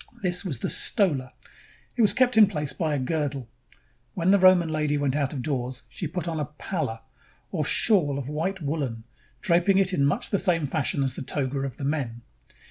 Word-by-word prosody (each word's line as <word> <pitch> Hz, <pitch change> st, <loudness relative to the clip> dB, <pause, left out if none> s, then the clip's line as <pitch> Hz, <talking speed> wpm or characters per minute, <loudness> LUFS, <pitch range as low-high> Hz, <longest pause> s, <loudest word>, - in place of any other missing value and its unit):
This 180 Hz, 0 st, +1 dB
was 165 Hz, -10 st, -3 dB
the -, -, -3 dB
"stola." 145 Hz, -, +1 dB, 0.6 s
It 240 Hz, -, +1 dB
was 210 Hz, -, +5 dB
kept 255 Hz, -2 st, +3 dB
in 215 Hz, -2 st, +8 dB
place 150 Hz, -7 st, -3 dB
by 155 Hz, -4 st, -1 dB
a -, -, -1 dB
girdle. 140 Hz, -2 st, -2 dB, 0.7 s
When 180 Hz, +1 st, +2 dB
the 200 Hz, -, +5 dB
Roman 185 Hz, -2 st, +6 dB
lady 150 Hz, -1 st, 0 dB
went 140 Hz, -2 st, 0 dB
out 140 Hz, -3 st, 0 dB
of 135 Hz, -4 st, -5 dB
doors, 130 Hz, -2 st, -3 dB
she 170 Hz, -, -4 dB
put 170 Hz, +2 st, -4 dB
on 165 Hz, -2 st, -2 dB
a 150 Hz, -, -1 dB
palla," 150 Hz, -6 st, -5 dB, 0.5 s
or -, -, -1 dB
shawl 155 Hz, -11 st, +3 dB
of 135 Hz, -2 st, -5 dB
white 165 Hz, +5 st, -3 dB
woolen, 140 Hz, -7 st, -3 dB, 0.4 s
draping 185 Hz, +1 st, +3 dB
it 195 Hz, -1 st, +3 dB
in 140 Hz, -, +1 dB
much 140 Hz, -, 0 dB
the 200 Hz, -, +2 dB
same 165 Hz, -4 st, +1 dB
fashion 140 Hz, -1 st, -1 dB
as 135 Hz, -2 st, -1 dB
the -, -, -6 dB
toga 135 Hz, 0 st, -2 dB
of 135 Hz, -2 st, -4 dB
the 140 Hz, -, -5 dB
men. 130 Hz, -6 st, -3 dB
150 Hz, 205 wpm, -25 LUFS, 135-180 Hz, 0.7 s, in